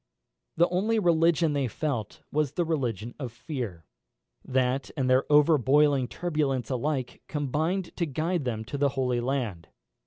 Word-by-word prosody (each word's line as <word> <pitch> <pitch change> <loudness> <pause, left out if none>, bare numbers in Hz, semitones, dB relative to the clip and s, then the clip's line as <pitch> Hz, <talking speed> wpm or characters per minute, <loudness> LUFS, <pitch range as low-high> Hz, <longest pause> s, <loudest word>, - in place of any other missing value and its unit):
The 170 +2 +5
only 210 +6 +1
religion 165 -4 +3
they 140 -2 0
felt 120 -3 -3
was 150 -2 0
the 175 +2 0
religion 120 - -2
of 130 -5 -4
fear. 120 - -6 0.6
That 130 +1 0
and 130 -2 +1
their 130 +1 +4
overboiling 145 -2 +4
turbulence 145 -8 -1
alike 130 0 -2
combined 160 +6 -1
to 170 - 0
guide 160 +4 -1
them 110 -3 -3
to 140 - -5
the 140 0 +3
Holy 125 -2 0
Land. 120 -10 -2
140 Hz, 145 wpm, -27 LUFS, 125-155 Hz, 0.6 s, The